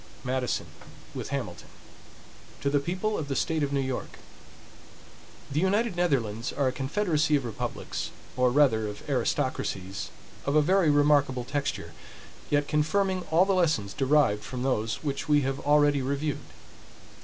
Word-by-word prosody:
MADISON, 130 -1 -1 0.5
with - - -5
HAMILTON - - -4 0.9
To 140 - 0
the 145 - +3
People 185 +8 -2
of 150 - -4
the 135 - -2
State 160 +2 0
of 140 -1 0
New 140 - +1
York: 130 -2 -3 1.3
THE 145 - +1
United 200 +3 +1
Netherlands 125 -10 0
are 140 -2 0
a - - +2
confederacy 150 +3 +1
of 140 -3 0
republics, 115 - -4 0.3
or 125 0 +3
rather 120 -5 +3
of 105 0 -8
aristocracies 95 +1 -1 0.3
of 140 - 0
a 155 - +6
very 185 0 +3
remarkable 145 -3 +3
texture, 140 - -3 0.6
yet 145 0 +2
confirming 185 +5 +1
all 170 +4 +5
the 195 - +2
lessons 155 - +1
derived 135 -7 +2
from 125 -1 -5
those 115 -3 -1
which 145 +1 -3
we 150 -1 +5
have 135 0 -2
already 145 -1 +3
reviewed. 140 +2 -2
145 Hz, 145 wpm, -28 LUFS, 130-155 Hz, 1.3 s, a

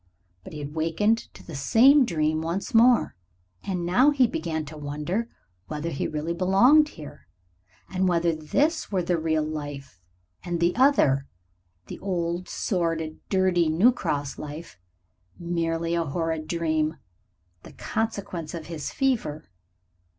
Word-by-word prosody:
But - - -11
he - - -6
had 145 0 -6
wakened 165 +8 0
to - - -14
the 165 - -9
same 255 - +5
dream 155 -4 0
once 175 - -3
more, 235 +2 +4 0.5
and 180 -3 -3
now 245 +11 +4
he 275 -3 +4
began 165 - -3
to 155 +2 -10
wonder 150 +10 -3 0.4
whether 155 +2 -4
he 135 - -2
really 155 +2 -3
belonged 235 - +5
here, 145 -2 -11 0.6
and 185 0 0
whether 170 -1 +2
this 280 - 0
were 185 -3 0
the 170 -1 0
real 160 -1 0
life, 145 - -7 0.4
and 175 -1 -3
the 170 +1 +2
other 185 - +3 0.6
the - - -9
old, 175 -2 -2
sordid, 165 -4 -2
dirty 185 -4 +2
New 180 +11 +5
Cross 145 - -3
life 150 - -8 0.6
merely 165 -1 -2
a 170 -1 +1
horrid 160 +1 -2
dream, 160 -2 0 0.6
the - - -14
consequence 200 -7 -4
of 165 -2 -7
his 160 -3 -5
fever. 215 - -1
170 Hz, 140 wpm, -25 LUFS, 155-195 Hz, 0.6 s, same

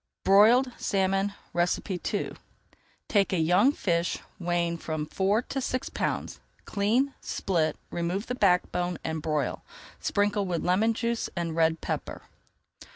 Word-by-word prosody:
BROILED 225 +7 +6
SALMON 195 +1 +1 0.2
II 180 +1 -1 0.8
Take 200 -2 +2
a 185 - +1
young 180 - +4
fish 170 - 0 0.2
weighing 170 -1 0
from 155 -2 -3
four 195 +8 +1
to 270 - -4
six 255 0 -2
pounds, - - -3 0.3
clean, 230 +7 +1
split, 160 -5 -1
remove 175 +5 -2
the 250 - -3
backbone 180 -4 +1
and 160 -1 -3
broil. 150 -3 -1 0.4
Sprinkle 205 -1 +1
with 170 -2 -2
lemon 215 +6 +3
juice 235 0 -1
and 170 -2 -2
red 165 0 +2
pepper. - - -4
190 Hz, 125 wpm, -28 LUFS, 170-210 Hz, 0.8 s, BROILED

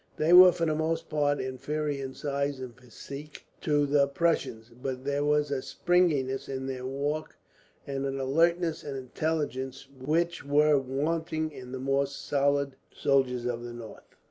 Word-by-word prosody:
They 160 +3 +3
were, 180 0 +11
for 170 -1 -1
the 155 - +1
most 160 +1 -1
part, 145 -1 +1
inferior 140 +2 -3
in 130 0 -6
size 140 -1 -2
and 125 -2 -7
physique 140 +4 -10 0.2
to 145 -2 +2
the 140 0 +3
Prussians; 140 -7 -1
but 130 0 -4
there 140 0 0
was 150 0 +2
a 135 -2 -1
springiness 150 -8 +1
in 130 -1 -4
their 130 -1 -4
walk, 145 +3 -3 0.5
and 140 0 -2
an 135 0 -3
alertness 165 +5 +1
and 140 -2 -5
intelligence 135 -1 -3 0.2
which 170 +4 0
were 145 +1 +4
wanting 155 +4 -2
in 125 -3 -10
the 130 - -4
more 135 +1 +1
solid 140 0 0
soldier 125 -3 +1
of 120 0 -6
the 120 0 -7
north. 115 -2 -11
140 Hz, 160 wpm, -28 LUFS, 130-155 Hz, 0.5 s, were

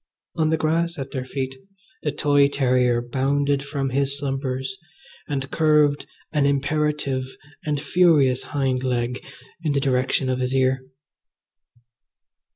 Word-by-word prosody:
On 160 -2 +2
the 160 - +2
grass 165 +2 0
at 135 -1 -5
their 130 -1 -4
feet 130 0 -3 0.5
the 150 - -1
toy 145 -1 +3
terrier 125 -3 +2
bounded 140 +3 0
from 140 -1 -3
his 140 +1 +1
slumbers 135 +3 -3 0.5
and 135 -2 -3
curved 150 -2 +3 0.2
an 145 -3 +2
imperative 140 -2 0 0.4
and 150 -2 0
furious 145 -4 +3
hind 130 -3 -1
leg 125 -1 -1 0.4
in 155 -3 +1
the 140 - +2
direction 130 0 +1
of 130 0 0
his 130 +1 -1
ear. 130 0 +2
140 Hz, 130 wpm, -23 LUFS, 130-150 Hz, 0.5 s, toy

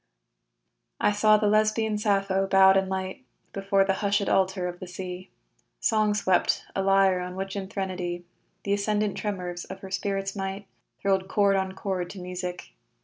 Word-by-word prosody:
I - - +3
saw 215 +1 +4
the 210 - 0
Lesbian 215 +1 +2
Sappho 195 -2 +1
bowed 190 0 +6
in 190 0 +2
light 190 +5 -4 0.3
Before 195 0 +2
the 195 - +2
hushed 200 0 +1
altar 190 -1 +1
of 175 0 -6
the 185 - -7
sea 180 0 -7 0.5
Song 215 -2 +2
swept, 195 -3 +2
a 195 - +1
lyre 195 -1 +4
on 180 0 -5
which 195 +1 -4
in 195 -1 -4
threnody 185 -3 -4 0.4
Th' - - -6
ascendant 205 0 0
tremors 180 -4 -4
of 190 0 -9
her 190 - -9
spirit's 195 0 -2
might 195 +1 -4 0.4
Thrilled 190 -1 +1
chord 200 0 +3
on 190 -1 -1
chord 190 -2 -3
to 195 - -9
music. 180 - -6
195 Hz, 165 wpm, -26 LUFS, 185-200 Hz, 0.5 s, bowed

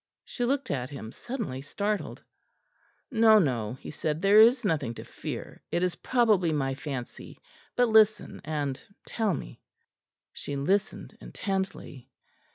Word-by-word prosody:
She 245 - -3
looked 275 +2 -1
at 130 -2 -2
him, 115 -6 -8
suddenly 225 - -5
startled. 200 +8 -3 0.9
"No, 220 -2 +6
no," 120 - +1
he - - -9
said, 155 0 -2
"there 200 +4 +6
is 240 +2 +5
nothing 145 - 0
to - - -8
fear; - - -7
it 175 - 0
is 180 -1 +1
probably 215 -9 +2
my 135 -3 0
fancy; 135 -3 -7 0.4
but 245 0 +4
listen 220 -1 +3
and 145 -4 -3 0.2
tell 215 -6 0
me." - - -9 0.7
She 145 - -5
listened 200 +9 -1
intently. 190 -9 -4
180 Hz, 135 wpm, -28 LUFS, 140-220 Hz, 0.9 s, No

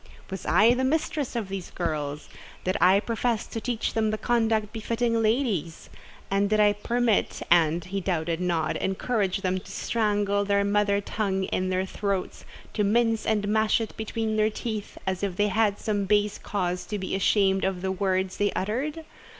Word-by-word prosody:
"Was 190 - -6
I 215 +6 +5
the 255 +1 -1
mistress 295 -1 -1
of 225 -4 -2
these 190 -2 -5
girls? 150 -4 -3 0.4
Did 185 +1 0
I 185 +3 +6
profess 230 +1 -1
to 225 - -6
teach 240 -2 -2
them 220 -1 +1
the 215 - -1
conduct 220 -3 +1
befitting 230 +1 0
ladies?—and 200 - -2
did 215 0 +2
I 210 -1 +5
permit 230 +1 0
and, 170 -1 +4
he 195 +1 -3
doubted 170 -2 -1
not, 170 -3 0
encourage 195 0 -1
them 185 -1 0
to - - -12
strangle 205 -3 0
their 200 0 +2
mother 200 0 +2
tongue 195 -2 -1
in 185 0 -1
their 185 0 0
throats, 195 -1 -3 0.3
to 210 - +1
mince 225 +2 +2
and 210 -2 +1
mash 220 +1 +3
it 225 -2 -5
between 220 0 -2
their 215 0 +3
teeth, 215 -1 -5
as 190 -1 -2
if 195 -3 -2
they 205 +2 +2
had 210 -1 +2
some 205 -2 -1
base 205 +1 +1
cause 180 -3 -2
to 210 - -3
be 190 -1 -4
ashamed 195 0 +2
of 190 -1 -1
the 190 - 0
words 190 -1 -1
they 205 0 +1
uttered? 285 - -2
205 Hz, 175 wpm, -26 LUFS, 190-220 Hz, 0.4 s, I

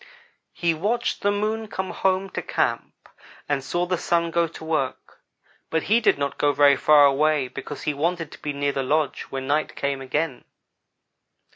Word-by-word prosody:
"He 170 -1 +1
watched 220 +9 -1
the 205 - +2
Moon 215 +2 -1
come 190 -2 -4
home 190 0 0
to - - -3
camp - - -2 0.4
and 145 -2 -1
saw 175 +5 -1
the 180 -1 -1
Sun 170 -1 0
go 170 0 +2
to 160 - -11
work, 155 -5 -3 0.5
but 160 -1 0
he 220 +4 +3
did 225 - +3
not 140 -1 -3
go 145 0 +3
very 140 0 +5
far 145 +1 +6
away 145 0 +2
because 145 +3 -8
he 150 - 0
wanted 165 +2 -2
to - - -12
be 150 - -3
near 140 0 -1
the 135 - -2
lodge 150 +2 0
when 135 -1 -4
night 150 +3 0
came 140 -1 -2
again. 135 +1 -2
155 Hz, 180 wpm, -24 LUFS, 140-180 Hz, 0.5 s, far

